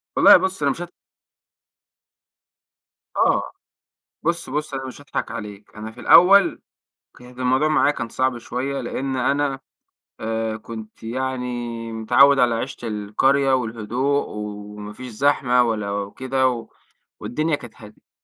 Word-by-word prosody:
والله -, -, +8 dB
بُص 190 Hz, -3 st, -2 dB
أنا 140 Hz, -1 st, +3 dB
مش 170 Hz, -, -6 dB
هاض 175 Hz, -, -6 dB, 2.3 s
آه، -, -, +2 dB, 0.7 s
بُص 170 Hz, -2 st, -1 dB
بُص، 150 Hz, +1 st, -3 dB
أنا 135 Hz, -1 st, -4 dB
مش 130 Hz, -, -9 dB
هاضحك 145 Hz, -, -4 dB
عليك 105 Hz, -3 st, -8 dB
أنا 110 Hz, +1 st, -6 dB
في 115 Hz, +2 st, -13 dB
الأول، 195 Hz, +3 st, +6 dB, 0.6 s
كانت 125 Hz, 0 st, -14 dB
الموضوع 130 Hz, +4 st, +2 dB
معايا 155 Hz, -2 st, +3 dB
كان 115 Hz, -5 st, -5 dB
صعب 130 Hz, +1 st, 0 dB
شويّة 130 Hz, +4 st, -4 dB
لأن 130 Hz, +2 st, -3 dB
أنا 140 Hz, +1 st, 0 dB, 0.6 s
آآ 110 Hz, 0 st, -2 dB
كنت 110 Hz, 0 st, -10 dB
يعني 120 Hz, -1 st, -4 dB
متعوّد 135 Hz, +5 st, +4 dB
على 120 Hz, -2 st, +3 dB
عيشة 120 Hz, 0 st, -5 dB
القرية 130 Hz, +6 st, +1 dB
والهدوء 125 Hz, +4 st, 0 dB
وما 105 Hz, 0 st, -7 dB
فيش 130 Hz, +4 st, -9 dB
زحمة 125 Hz, 0 st, +3 dB
ولا 105 Hz, -4 st, -1 dB
وكده، 125 Hz, +4 st, -1 dB, 0.5 s
والدنيا 155 Hz, +4 st, -1 dB
كانت 120 Hz, -5 st, -12 dB
هادية. 105 Hz, 0 st, -16 dB
125 Hz, 130 wpm, -22 LUFS, 110-140 Hz, 2.3 s, والله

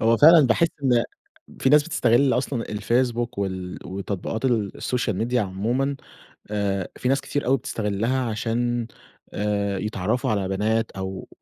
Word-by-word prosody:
هو 115 Hz, +1 st, +4 dB
فعلًا 155 Hz, 0 st, +8 dB
باحس 165 Hz, +8 st, +3 dB
إن 120 Hz, -3 st, +3 dB, 0.6 s
في -, -, +3 dB
ناس 150 Hz, +2 st, +6 dB
بتستغل 135 Hz, -4 st, +2 dB
أصلًا 125 Hz, -2 st, -1 dB
الفيسبوك 120 Hz, +2 st, 0 dB
وال 95 Hz, -2 st, -3 dB
وتطبيقات 100 Hz, +4 st, -4 dB
السوشيال 120 Hz, -2 st, 0 dB
ميديا 120 Hz, +1 st, +1 dB
عمومًا، 120 Hz, +9 st, -1 dB, 0.5 s
آآ، 100 Hz, -3 st, -1 dB
في 125 Hz, -, -1 dB
ناس 135 Hz, +1 st, +2 dB
كتير 145 Hz, -, -3 dB
أوي 135 Hz, +2 st, +4 dB
بتستغلها 115 Hz, +3 st, -1 dB
عشان، 120 Hz, +2 st, -1 dB, 0.5 s
آآ، 100 Hz, -1 st, -1 dB
يتعرّفوا 110 Hz, +5 st, -1 dB
على 100 Hz, -3 st, 0 dB
بنات 110 Hz, +3 st, 0 dB
أو 95 Hz, 0 st, -6 dB
115 Hz, 135 wpm, -24 LUFS, 100-125 Hz, 0.6 s, فعلًا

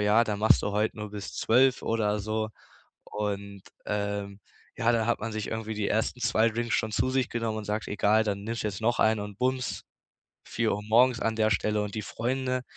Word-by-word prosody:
ja, 105 Hz, +2 st, +4 dB
da 105 Hz, -2 st, -2 dB
machst 110 Hz, +2 st, +4 dB
du 100 Hz, -, -1 dB
heute 105 Hz, +1 st, 0 dB
nur 105 Hz, -1 st, -5 dB
bis 105 Hz, -1 st, -7 dB
12 130 Hz, +3 st, +3 dB
oder 105 Hz, -2 st, 0 dB
so. 110 Hz, +1 st, -2 dB, 0.6 s
Und, 100 Hz, -1 st, -4 dB, 0.2 s
ähm, 100 Hz, -1 st, -3 dB, 0.4 s
ja, 115 Hz, +1 st, +2 dB
dann 115 Hz, -1 st, +1 dB
hat 120 Hz, -, +1 dB
man 115 Hz, +1 st, -4 dB
sich 110 Hz, -1 st, -3 dB
irgendwie 110 Hz, -1 st, -4 dB
die 105 Hz, -1 st, -1 dB
ersten 110 Hz, +3 st, 0 dB
2 115 Hz, 0 st, +3 dB
Drinks 115 Hz, 0 st, -2 dB
schon 110 Hz, -1 st, 0 dB
zu 130 Hz, -, +1 dB
sich 130 Hz, -2 st, +1 dB
genommen 115 Hz, -2 st, -2 dB
und 110 Hz, -, -6 dB
sagt: 105 Hz, +1 st, -3 dB
„Egal, 105 Hz, +2 st, +3 dB
dann 100 Hz, -1 st, -2 dB
nimmst 115 Hz, +1 st, -3 dB
du -, -, -2 dB
jetzt 95 Hz, -2 st, -6 dB
noch 115 Hz, +2 st, +1 dB
einen” 110 Hz, -1 st, +3 dB
und 105 Hz, -1 st, -7 dB
bums, 130 Hz, 0 st, -1 dB, 0.6 s
4:00 110 Hz, -2 st, -1 dB
morgens 120 Hz, +3 st, +4 dB
an 110 Hz, 0 st, 0 dB
der 110 Hz, -1 st, +2 dB
Stelle. 105 Hz, +1 st, +1 dB
Und 105 Hz, -1 st, -4 dB
die 110 Hz, -, -2 dB
Freunde, 130 Hz, +3 st, -2 dB
110 Hz, 210 wpm, -28 LUFS, 105-115 Hz, 0.6 s, ja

